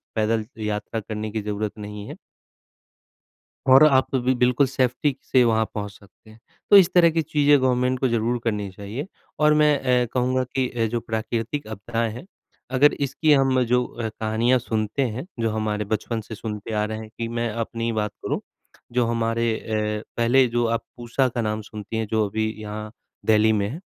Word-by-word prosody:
पैदल 110 0 +1 0.2
यात्रा 105 +2 -3
करने 110 0 -5
की 110 -1 -2
ज़रूरत 105 +1 -3
नहीं 105 0 -7
है। - - -7 1.6
और 145 +3 +9
आप 135 -3 +4
तो 135 - +2
अभी 130 +1 +1
बिल्कुल 125 +2 +3
सेफ्टी 130 +2 0
से 130 - +3
वहाँ 110 -1 +3
पहुँच 105 -1 -4
सकते 100 +2 -20
हैं, 110 - -16 0.3
तो 205 - +9
इस 190 -2 +7
तरह 170 -2 +6
की 165 0 0
चीज़ें 145 -1 +4
गवर्नमेंट 125 0 +1
को 130 - +2
ज़रूर 115 +1 0
करनी 105 -3 -1
चाहिए 105 - -6 0.3
और 150 0 +5
मैं 150 -1 +4
अ, 125 -1 +2
कहूँगा 130 0 +1
कि 130 -1 +1
अ, 115 -2 -1
जो 120 +2 -2
प्राकृतिक 115 +5 -3
आपदाएँ 115 +2 -2
हैं 125 +9 -9 0.5
अगर 145 +3 +6
इसकी 150 +2 +2
हम 135 -2 +3
जो 125 +1 +2
अ, 115 -2 -5
कहानियाँ 110 +4 +1
सुनते 110 +1 -2
हैं, 125 +4 -3
जो 115 -1 +1
हमारे 105 -1 -1
बचपन 110 +2 -3
से 110 +1 -9
सुनते 105 0 -6
आ 105 0 +1
रहे 110 0 -4
हैं 110 -1 -8
कि 115 0 -2
मैं 115 0 -2
अपनी 115 +1 -3
बात 105 -2 -1
करूँ, - - -1 0.5
जो 120 -1 +2
हमारे 115 0 0
अ, 105 -1 -2
पहले 125 +3 +4
जो 120 0 +1
आप 115 0 -1
पूसा 120 +2 0
का 120 0 -3
नाम 110 0 -1
सुनती 105 +1 -7
हैं 110 - -1
जो 110 -1 +2
अभी 110 +2 -1
यहाँ 105 0 -6 0.4
दिल्ली 110 0 +4
में 100 -2 0
है 130 - -5
115 Hz, 190 wpm, -23 LUFS, 110-125 Hz, 1.6 s, और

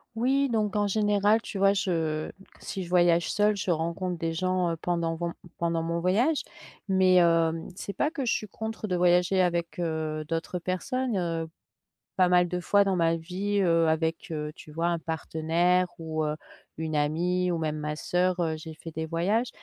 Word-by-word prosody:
Oui, 270 +4 +2
donc 215 -3 0
en 205 0 +2
général, 210 +1 +2
tu 210 - -7
vois, 195 +1 +4
je 165 -6 -1 0.3
si 190 -2 -5
je - - -11
voyage 175 -1 +3
seule, 210 0 +2
je 195 - -3
rencontre 170 +2 -1
des 165 0 -2
gens, 185 +1 0
heu, 165 - -3
pendant 170 0 -1
von 170 0 -3 0.2
pendant 165 -1 0
mon 170 +1 -1
voyage. 230 - +2 0.4
Mais, 190 -1 +4
hem, 165 -2 +3
c'est 200 - -5
pas 295 +9 0
que 280 -5 -3
je 235 - +1
suis 215 - -1
contre 220 +1 -5
de 180 - 0
voyager 180 +1 +3
avec, 170 -2 -1
heu, 160 -2 -2
d'autres 165 +2 -3
personnes, 230 +7 -2
heu, 165 -2 -2 0.7
pas 185 -1 +4
mal 180 0 +4
de 180 +1 -3
fois 200 +3 +3
dans 195 - +1
ma 165 -2 +2
vie, 195 +5 -2
heu, 165 -2 +3
avec, 160 +3 -1
heu, 150 -1 -3
tu 155 - -13
vois, 165 +3 -1
un 170 -1 0
partenaire 165 +3 +1
ou, 160 -1 -3
heu, 150 0 -2 0.4
une 160 0 -3
amie 175 +5 +1
ou 175 - 0
même 155 -2 -2
ma 150 0 -3
soeur, 180 +2 0
heu, 165 -2 0
j'ai 160 0 -9
fait 165 +1 -9
des 160 +1 -3
voyages, 195 +9 0
175 Hz, 195 wpm, -27 LUFS, 165-195 Hz, 0.7 s, vois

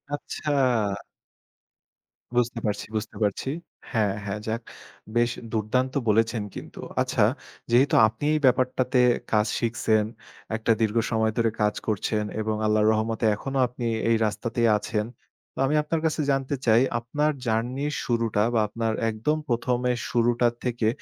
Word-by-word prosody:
আচ্ছা। 150 +1 -4 1.8
বুঝতে 120 -1 +1
পারছি, 105 -1 -1
বুঝতে 110 0 -4
পারছি। 105 +6 -1 0.4
হ্যাঁ, 105 -5 +1
হ্যাঁ, 100 +1 -3
যাক। 115 +2 -2 0.5
বেশ 120 0 +3 0.2
দুর্দান্ত 125 +4 0 0.2
বলেছেন 115 +1 +2
কিন্তু। - - -9 0.2
আচ্ছা, - - +1 0.5
যেহেতু 130 +4 +4
আপনি 110 +4 -8
এই 155 - +2
ব্যাপারটাতে 130 0 +2 0.3
কাজ 105 0 +3
শিখছেন, 115 -2 +1 0.5
একটা 110 +1 +1
দীর্ঘ 110 +1 +1
সময় 110 0 +2
ধরে 115 -1 +3
কাজ 105 0 +2
করছেন 105 0 0 0.2
এবং 110 0 -1
আল্লাহর 110 0 +3
রহমতে 110 +1 -1
এখনো 135 +5 -4
আপনি 120 0 -6 0.2
এই 115 - +5
রাস্তাতেই 115 +2 0
আছেন। 105 0 -2 0.5
তো - - -29
আমি 150 - +1
আপনার 160 +1 -1
কাছে 160 0 +1
জানতে 135 +1 0
চাই, 115 0 +5 0.2
আপনার 145 +6 0
জার্নির 125 +6 -1
শুরুটা 115 -3 +1
বা 115 - +3
আপনার 115 +1 -2 0.2
একদম 115 +8 0
প্রথমে 125 +1 0 0.2
শুরুটা 120 0 +2 0.2
থেকে, 120 -3 0
115 Hz, 135 wpm, -25 LUFS, 110-125 Hz, 1.8 s, এই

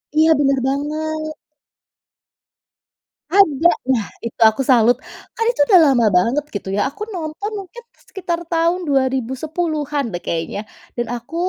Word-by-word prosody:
Iya 320 +1 +5
bener 275 -2 +2
banget. 310 +2 -3 2.0
Ada! 330 -5 +5 0.2
Nah 225 -5 0 0.2
itu 230 - -6
aku 220 +5 -3
salut. 245 -2 +4 0.4
Kan 455 - -1
itu 295 - -2
udah 370 -3 +7
lama 240 -3 +3
banget 250 +10 +1
gitu 195 -1 -4
ya 205 - 0
aku 410 +9 -8
nonton 330 +6 -5
mungkin 395 +6 -11 0.2
sekitar 345 -3 -3
tahun 335 +2 +2
2010-an 285 +3 -1
deh 175 - -4
kayaknya 170 +5 -3 0.3
dan 240 -1 -3
aku 240 +8 -9
290 Hz, 130 wpm, -19 LUFS, 245-330 Hz, 2.0 s, udah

